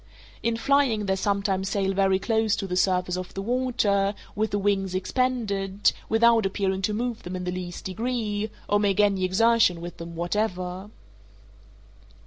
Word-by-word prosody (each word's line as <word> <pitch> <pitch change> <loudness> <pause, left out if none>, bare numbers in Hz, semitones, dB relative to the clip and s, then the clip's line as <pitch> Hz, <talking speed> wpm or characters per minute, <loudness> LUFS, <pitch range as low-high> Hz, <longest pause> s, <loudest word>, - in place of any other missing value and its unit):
In 230 -1 0
flying 260 -5 +2
they 190 -1 +1
sometimes 195 -1 0
sail 195 -1 0
very 195 0 +3
close 220 +1 +1
to 200 - -4
the 180 -1 -3
surface 180 -1 +1
of 185 -1 -7
the 195 - -3
water, 210 -5 +1 0.2
with 215 +1 0
the 205 - -1
wings 195 -2 0
expanded, 200 -2 0 0.2
without 230 0 +4
appearing 190 0 -1
to 210 +2 0
move 235 0 -2
them 180 +1 -6
in 180 - -4
the 180 - -2
least 180 -1 -6
degree, 215 0 -2 0.2
or 205 - +2
make 205 -1 +1
any 200 -2 +3
exertion 205 -1 +3
with 175 +1 -8
them 170 0 -8
whatever. 185 +1 -2
200 Hz, 160 wpm, -25 LUFS, 185-220 Hz, 0.2 s, without